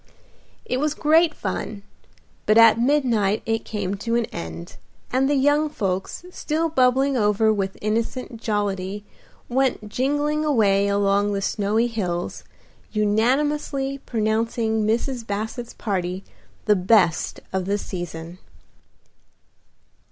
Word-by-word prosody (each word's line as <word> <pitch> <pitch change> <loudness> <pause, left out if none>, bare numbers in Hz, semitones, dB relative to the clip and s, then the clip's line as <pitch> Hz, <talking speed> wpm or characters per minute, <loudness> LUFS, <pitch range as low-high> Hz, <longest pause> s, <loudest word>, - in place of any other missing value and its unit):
It 250 - -1
was 300 +1 0
great 320 +2 +3
fun, 200 -2 -4 0.6
but 215 - +5
at 230 -1 +7
midnight 235 -7 +2
it 225 0 -1
came 200 -3 -3
to 230 +3 -2
an 235 -1 +2
end, 85 0 -7 0.3
and 265 +2 +2
the 290 - +2
young 290 +3 +3
folks, 195 - -3
still 325 -1 -1
bubbling 265 -1 +3
over 215 -1 +3
with 195 -2 -2
innocent 230 +2 -2
jollity, 205 -2 -2 0.4
went 255 -4 0
jingling 290 +5 0
away 205 -9 +3
along 200 0 +2
the 200 - -1
snowy 210 +4 +1
hills, 180 -7 -3 0.5
unanimously 270 +6 0
pronouncing 220 -1 0
Mrs. 235 +1 -1
Basset's 220 +4 -4
party 185 -3 -3 0.4
the 210 - +4
best 185 -3 +2
of 190 -1 -1
the 200 +2 0
season. 175 -2 -7
220 Hz, 115 wpm, -23 LUFS, 200-260 Hz, 0.6 s, at